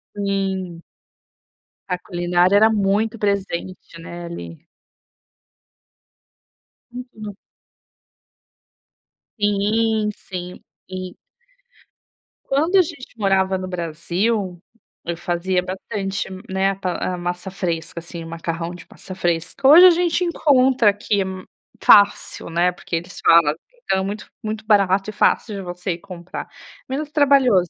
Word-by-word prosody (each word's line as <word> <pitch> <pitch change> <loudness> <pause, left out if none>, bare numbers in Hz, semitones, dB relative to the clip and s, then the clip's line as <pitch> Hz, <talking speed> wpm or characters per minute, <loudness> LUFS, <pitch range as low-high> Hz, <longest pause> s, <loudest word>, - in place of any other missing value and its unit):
Sim. 190 -3 -2 1.1
A 180 -1 -1
culinária 175 +1 +1
era 220 +2 +6
muito 215 +2 +1
presente, 185 -4 -3
né, 170 +1 -8
ali. 85 - -9 2.3
Uhum. 220 -5 -8 2.0
Sim, 210 +1 +1
sim, 180 -1 -8 0.3
e 185 -1 -6 1.3
quando 320 +8 +2
a - - +8
gente 285 -8 -7
morava 190 -2 +2
no 185 0 -5
Brasil, 180 +3 -2 0.4
eu 170 -1 -3
fazia 180 +1 -1
bastante, 195 +1 -4 0.2
né, 190 +1 +1
pa 185 -1 -3
a - - -7
massa 175 +2 -4
fresca, 170 -3 -3
assim, 170 0 -8
o - - -9
macarrão 165 +1 -4
de 170 - -12
massa 185 - -10
fresca, 175 +9 -1
hoje 340 +6 +10
a - - +8
gente 345 +1 +1
encontra 265 -8 +3
aqui 205 0 0
m 190 -1 -5 0.4
fácil, 205 -4 +4
né, 175 +2 +2
porque 175 -1 -6
eles 175 +2 -5
falam, 165 -3 +6 0.3
então 190 - +1
é - - -1
muito 205 +2 -5 0.2
muito 215 0 -4
barato 200 -1 +3
e - - -6
fácil 210 +1 +1
de 195 - -5
você 180 0 -4
ir - - -7
comprar, 175 -1 -8 0.4
menos 295 +3 -3
trabalhoso 265 - +4
190 Hz, 120 wpm, -21 LUFS, 175-215 Hz, 2.3 s, hoje